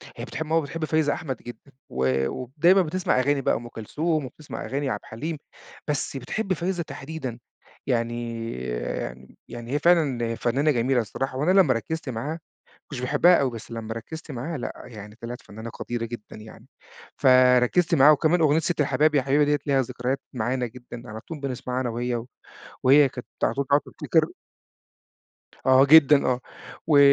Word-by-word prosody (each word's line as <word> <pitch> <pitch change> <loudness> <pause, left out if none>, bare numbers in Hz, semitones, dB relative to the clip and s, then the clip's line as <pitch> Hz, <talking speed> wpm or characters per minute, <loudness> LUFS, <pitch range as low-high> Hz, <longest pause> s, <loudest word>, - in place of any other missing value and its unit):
هي - - -6
بتحِب 160 - -5
ماما 165 +1 +2
بتحِب 155 +2 -4
فايزة 155 -2 +1
أحمد 135 -6 -4
جدًا 120 +4 -12 0.2
و 65 +1 +1
وب 125 -1 -6
دايمًا 180 +5 +6
بتسمَع 180 -4 0
أغاني 140 +2 +1
بقى - - +2
وأم 120 - -5
كلثوم، 150 +7 -2
وبتسمَع 145 +3 -8
أغاني 135 +4 -2
عبد - - -2
الحليم، 150 +9 -5 0.5
بس 145 -2 -2
بتحِب 190 - -2
فايزة 175 +1 -2
تحديدًا. 135 -6 -7 0.5
يعني 115 -1 -2 1.0
يعني 120 0 -8
هي 145 - +1
فعلًا 140 -9 +2
فنانة 140 +7 +1
جميلة 125 -1 +2
الصراحة، 130 +4 -4
وأنا 150 +7 +2
لمّا 135 -8 +3
ركِّزت 140 +6 -4
معاها، 120 +5 -3
ما 165 - -5 0.5
كنتش 140 -4 -5
باحِبها 150 +7 +4
أوي، 135 -2 +1
بس 115 -1 -9
لمّا 115 -1 -5
ركِّزت 160 +8 -8
معاها 145 +5 -4
لأ، 120 - -6
يعني 105 -3 -10
طلَعت 120 +1 -6
فنانة 110 +3 -9
قديرة 120 0 -4
جدًا 115 -2 -8
يعني. 110 +2 -13 0.5
فركِّزت 130 +5 +5
معاها، 145 -1 +7
وكمان 155 +4 +2
أغنية 155 -1 +4
ستّ 165 0 -1
الحباب 150 +2 +2
يا 140 - +4
حبيبة 140 +2 +3
ديّة 145 0 +2
ليها 135 -2 +3
ذكريات 130 +2 -3
معانا 125 +1 -1
جدًا، 120 0 -10
على 110 +1 -7
طول 155 +5 -9
بنسمَعها 130 -2 -3
أنا 125 -2 -1
وهي، 120 +1 -2
و 115 0 -6 0.6
وهي 140 +2 +6
كانت 125 0 -9 0.2
على - - +2
طول 140 0 -1
بقى 140 - +5
بتفتكِر - - 0 1.4
آه 130 +1 +6
جدًا، 150 -1 +7
آه 125 0 +1 0.5
و 150 -3 +5
130 Hz, 175 wpm, -25 LUFS, 120-150 Hz, 1.4 s, معاها